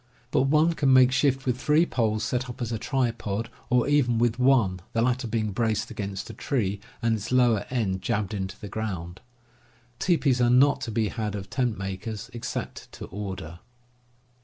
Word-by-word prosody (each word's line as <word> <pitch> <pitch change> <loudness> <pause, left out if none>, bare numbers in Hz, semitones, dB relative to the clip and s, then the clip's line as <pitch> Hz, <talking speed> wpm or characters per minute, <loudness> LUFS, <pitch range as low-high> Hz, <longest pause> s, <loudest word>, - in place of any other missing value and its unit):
But 135 -2 +3
one 155 +3 +4
can 140 -4 +2
make 130 -1 +7
shift 135 0 +1
with 125 -1 0
three 155 +3 +4
poles 110 -7 0
set 125 +3 -2
up 120 - -8
as 120 -2 -3
a 115 - -2
tripod, 115 -5 -2 0.2
or 125 0 +3
even 140 -5 +3
with 120 +1 +1
one, 125 -8 +3
the 115 - +1
latter 125 0 0
being 110 -1 -1
braced 110 +1 -1
against 100 -3 -5
a - - -12
tree, 105 -8 -1 0.2
and 115 -1 +2
its 110 +3 -6
lower 120 -5 +3
end 100 -7 -1
jabbed 105 0 -1
into 95 -1 -4
the 105 - -7
ground. 95 -5 -5 0.8
Teepees 140 -8 +2
are 120 - +4
not 135 +3 +4
to 115 - -4
be 110 -1 0
had 105 -3 -3
of 95 -1 -7
tent 125 -5 0
makers, 100 +4 -5
except 120 - -5
to - - -8
order. 95 -4 -6
115 Hz, 185 wpm, -26 LUFS, 105-130 Hz, 0.8 s, make